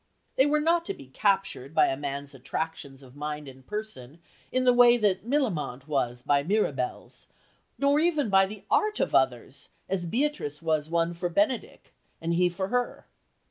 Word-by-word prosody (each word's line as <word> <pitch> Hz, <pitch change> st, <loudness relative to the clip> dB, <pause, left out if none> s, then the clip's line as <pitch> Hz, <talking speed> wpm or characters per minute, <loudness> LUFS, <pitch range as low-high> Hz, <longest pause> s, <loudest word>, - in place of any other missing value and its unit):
They 265 Hz, -, +4 dB
were 300 Hz, +1 st, +2 dB
not 335 Hz, +2 st, +2 dB
to -, -, -4 dB
be 135 Hz, -, -14 dB
captured 190 Hz, -5 st, 0 dB
by -, -, +6 dB
a 135 Hz, -, 0 dB
man's 140 Hz, 0 st, -5 dB
attractions 140 Hz, 0 st, -5 dB
of 130 Hz, 0 st, -16 dB
mind 150 Hz, 0 st, -5 dB
and 130 Hz, 0 st, -12 dB
person 190 Hz, -, -6 dB, 0.3 s
in 255 Hz, 0 st, +1 dB
the 250 Hz, -, +6 dB
way 245 Hz, 0 st, +7 dB
that 205 Hz, -2 st, 0 dB
Millamant 170 Hz, -, -1 dB
was 125 Hz, -4 st, -1 dB
by 140 Hz, +1 st, +3 dB
Mirabell's, 145 Hz, -8 st, -2 dB, 0.5 s
nor 280 Hz, +1 st, +3 dB
even 310 Hz, -5 st, +2 dB
by 195 Hz, 0 st, +5 dB
the 205 Hz, 0 st, -10 dB
art 425 Hz, 0 st, +2 dB
of -, -, 0 dB
others, -, -, 0 dB, 0.2 s
as 180 Hz, -3 st, -2 dB
Beatrice 235 Hz, -, -1 dB
was 155 Hz, -2 st, -1 dB
won 170 Hz, 0 st, +1 dB
for 175 Hz, +1 st, -3 dB
Benedick 210 Hz, +8 st, -1 dB, 0.3 s
and 165 Hz, +1 st, -2 dB
he 180 Hz, +1 st, +3 dB
for 190 Hz, +2 st, -4 dB
her. 245 Hz, 0 st, -2 dB
175 Hz, 175 wpm, -27 LUFS, 145-240 Hz, 0.5 s, way